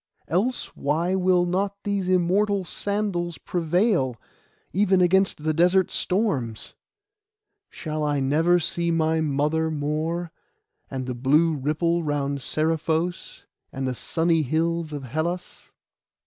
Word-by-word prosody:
Else 210 - -1
why 160 +6 0
will 185 -1 +3
not 195 +3 -1
these 200 -2 -1
immortal 190 +3 +2
sandals 185 -4 -2
prevail, 175 - 0 0.5
even 190 -1 +3
against 185 -2 +2
the 155 0 +1
desert 180 +3 +3
storms? 145 - -1 1.0
Shall 155 -2 -4
I 145 -1 +1
never 160 +6 +3
see 170 0 -1
my 160 -1 +1
mother 150 +2 0
more, 160 +3 -2 0.6
and 130 -1 -4
the 125 - -3
blue 150 +7 +3
ripple 155 +4 0
round 140 -2 -1
Seriphos, 160 +3 -1 0.3
and 135 0 -3
the 130 - -1
sunny 165 +5 +1
hills 160 +3 -1
of 145 -2 -5
Hellas? 160 +7 -4
165 Hz, 120 wpm, -24 LUFS, 150-180 Hz, 1.0 s, will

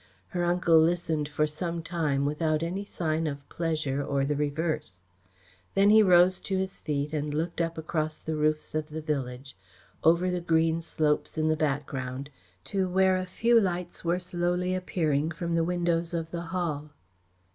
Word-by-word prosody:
Her 175 -1 -1
uncle 175 -2 +4
listened 160 -2 +1
for 150 0 +1
some 165 +2 -4
time 150 -5 0
without 155 +1 0
any 185 +4 -3
sign 160 -4 -1
of 140 -1 -6
pleasure 155 -4 -1
or 140 -1 0
the 145 +1 0
reverse. 150 - -2 0.7
Then 200 +1 +5
he 220 0 +8
rose 180 -2 +5
to 195 - -2
his 190 0 -3
feet 145 0 -2
and 150 -1 -1
looked 165 +3 -2
up 165 0 -2
across 155 -1 -2
the 160 - -4
roofs 155 0 0
of 155 0 -2
the 155 +1 -5
village, 135 -3 -4 0.5
over 170 +3 +4
the 180 -1 -1
green 165 -1 +2
slopes 155 -1 0
in 155 0 +2
the 155 - +3
background, 135 -2 -3 0.3
to 190 -2 -1
where 190 +1 +4
a 185 0 -2
few 230 +5 +4
lights 180 -2 -3
were 170 +1 +1
slowly 180 0 -1
appearing 160 -5 0
from 170 +1 -3
the 165 0 +2
windows 170 -1 0
of 165 -1 -3
the 170 0 -4
Hall. 160 -4 -2
165 Hz, 170 wpm, -28 LUFS, 150-175 Hz, 0.7 s, he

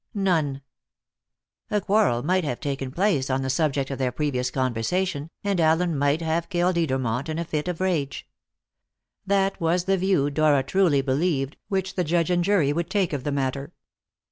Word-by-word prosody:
None. 160 -9 0 1.1
A 210 - +1
quarrel 195 - +2
might 185 +4 +1
have 125 -6 -3
taken 135 -3 -3
place 160 -3 0
on 135 0 0
the 130 - 0
subject 140 -1 0
of 135 - -4
their 130 -2 0
previous 130 -2 -1
conversation, 140 +6 -1
and 200 -3 0
Allen 160 +1 +2
might 145 +3 +1
have 165 +1 -1
killed 175 0 +1
Edermont 130 -4 -1
in 155 - -3
a 170 - -2
fit 150 0 -3
of 180 -2 -3
rage. 170 -7 -1 1.0
That 195 -1 +1
was 170 +2 +1
the 195 +1 +1
view, 180 -7 +2
Dora 145 -2 +3
truly 145 -2 +2
believed, 140 0 0
which 190 -2 -2
the 180 - 0
judge 170 +1 +1
and 175 -1 +2
jury 175 -7 +2
would 170 +2 -2
take 190 -5 0
of 140 -3 -3
the 145 - -2
matter. 135 0 -2
155 Hz, 175 wpm, -24 LUFS, 135-180 Hz, 1.1 s, Dora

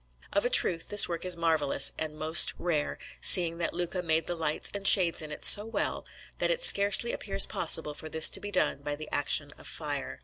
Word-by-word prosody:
Of 200 +3 -2
a - - -1
truth, 165 -8 +2
this 205 - +7
work 170 0 -8
is 180 -2 0
marvellous 160 -4 +2
and 155 -1 -8
most 160 +2 +3
rare, 160 -4 -5 0.2
seeing 170 -2 +3
that 170 - -4
Luca 175 +1 -6
made 160 -2 -3
the 175 - -6
lights 160 -3 -5
and 200 -1 -4
shades 175 -5 +2
in 155 -1 -11
it 150 - -10
so 205 - +5
well, 225 +1 -7 0.3
that - - -3
it - - -3
scarcely 205 - +4
appears 195 -1 +1
possible 160 -2 -3
for 155 +1 -13
this 160 0 +5
to - - +2
be 205 - -10
done 185 -7 -3
by 145 0 -7
the 155 +1 -12
action 145 0 -2
of - - -15
fire. 145 -3 -9
165 Hz, 215 wpm, -25 LUFS, 155-195 Hz, 0.3 s, this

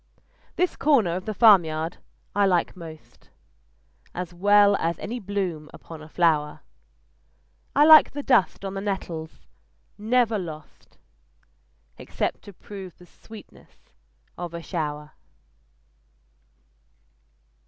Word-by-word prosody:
This 360 -1 0
corner 240 - +2
of 185 - -5
the 215 - -3
farmyard 170 -7 +4 0.4
I 205 -1 +3
like 180 -1 0
most: 155 - -13 0.9
As 180 -1 -5
well 205 +2 +4
as 165 0 -2
any 245 +3 -5
bloom 190 -7 -4
upon 160 -2 -11
a 155 - -12
flower 155 -3 +1 1.1
I 290 - +6
like 310 0 +8
the 285 0 -5
dust 200 -6 +2
on 195 - -4
the 195 - -4
nettles, 175 -5 -5 0.5
never 225 0 +1
lost 155 -4 -10 1.0
Except - - -4
to 200 - -11
prove 190 -1 -11
the 180 - -16
sweetness 175 - -17 0.5
of 175 -1 -6
a 170 - -7
shower. 150 -3 -4
180 Hz, 110 wpm, -24 LUFS, 160-205 Hz, 1.1 s, like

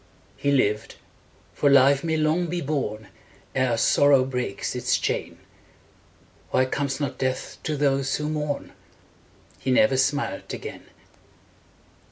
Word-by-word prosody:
He 140 - -1
lived, 110 -5 +1 0.6
for 145 - +2
life 140 +1 +5
may 160 -1 0
long 155 +3 +1
be 175 +2 -2
borne 130 -9 -3 0.4
Ere 130 -3 +1
sorrow 140 +2 +4
breaks 125 -6 -3
its - - +1
chain: - - -3 1.1
Why 130 - +2
comes 135 0 -2
not 140 -3 -3
death 130 0 -3
to 155 -2 -1
those 135 -1 +1
who 150 - -3
mourn? 150 -2 -3 0.9
He - - -4
never 130 0 +4
smiled 140 +2 -1
again. - - -9
140 Hz, 125 wpm, -24 LUFS, 130-150 Hz, 1.1 s, life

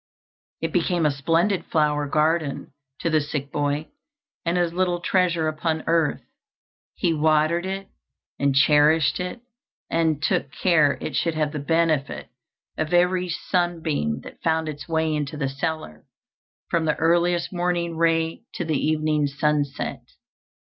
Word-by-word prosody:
It 165 -1 -2
became 175 -1 +1
a 150 - +4
splendid 165 +8 +1
flower 150 -2 +1
garden 155 -1 0 0.3
to 170 - 0
the 155 -1 +3
sick 145 -1 -4
boy, 145 +1 -1 0.5
and 170 +1 0
his 175 -1 +1
little 180 -1 0
treasure 175 -3 +1
upon 155 +1 -1
earth. 165 -3 +1 0.7
He 170 - +1
watered 155 +3 +2
it, 195 0 -4 0.5
and 140 -1 +2
cherished 150 +3 +4
it, 180 +6 -4 0.5
and 160 -3 +1
took 145 - 0
care 160 -5 +3
it - - -4
should 165 -2 0
have 155 -1 0
the 150 - -4
benefit 155 -1 0 0.5
of 155 +2 0
every 180 +1 +2
sunbeam 160 - -1
that - - -12
found 160 -1 +1
its 150 -1 -6
way 160 -1 +1
into 150 0 -3
the 140 -2 -1
cellar, 140 - -4 0.6
from 165 -1 0
the 155 - +1
earliest 170 +2 +1
morning 175 -1 -1
ray 165 0 +1
to 175 - -3
the 155 -3 -1
evening 155 -1 +1
sunset. 145 0 -1
160 Hz, 140 wpm, -24 LUFS, 150-170 Hz, 0.7 s, a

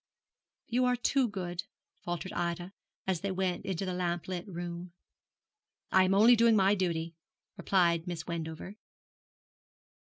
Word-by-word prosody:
'You 250 +2 +1
are 250 0 +3
too 255 +1 +2
good,' 180 -4 -4 0.4
faltered 175 +2 -4
Ida, 175 +2 -2 0.3
as 185 -3 -1
they 200 - -2
went 185 -1 -1
into 190 0 -2
the 185 - -2
lamplit 175 +1 -2
room. 175 -1 -6 1.0
'I 190 0 +6
am 190 +1 +2
only 225 +4 +7
doing 230 0 +5
my 195 -1 +5
duty,' 170 -4 -1 0.4
replied 175 -3 +2
Miss 170 -3 -4
Wendover. 170 +3 -5
180 Hz, 130 wpm, -31 LUFS, 170-195 Hz, 1.0 s, only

